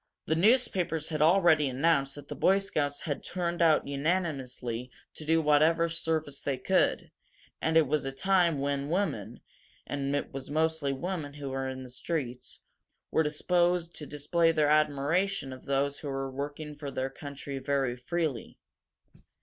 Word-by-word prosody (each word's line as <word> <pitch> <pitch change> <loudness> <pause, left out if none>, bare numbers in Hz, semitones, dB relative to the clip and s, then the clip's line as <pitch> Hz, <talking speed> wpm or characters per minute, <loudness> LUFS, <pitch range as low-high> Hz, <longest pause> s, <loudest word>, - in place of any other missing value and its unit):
The - - +1
newspapers 185 - +2
had 155 -2 -2
already 160 -3 +5
announced 135 +1 +1
that 145 -1 -10
the - - -5
Boy 195 - +3
Scouts 145 -8 -1
had 145 -4 -3
turned 175 -1 -2
out 160 -2 +4
unanimously 140 -6 -2 0.2
to - - -9
do 160 +1 +3
whatever 155 +3 +4
service 160 -3 -2
they 140 -2 -1
could, - - +1 0.5
and 160 0 +2
it 160 - +6
was 150 +2 0
a 135 - -3
time 175 +2 +2
when 140 0 -1
women 125 - -2 0.4
and 140 0 -2
it 145 - -3
was 135 -1 -6
mostly 155 -1 +1
women 150 +1 -4
who 145 -2 -6
were 135 0 -2
in 130 0 -5
the 130 - -10
streets 130 -2 -4 0.5
were - - +3
disposed 175 +3 +1
to 150 - -6
display 165 +3 +2
their 150 -2 +2
admiration 155 +2 +1
of 130 - -12
those 140 +1 0
who 150 - -7
were 135 -1 -3
working 145 +3 -5
for 145 -1 -6
the 135 0 -3
country 140 0 -7
very 135 -2 0
freely. 150 0 -3
150 Hz, 160 wpm, -29 LUFS, 135-165 Hz, 0.5 s, it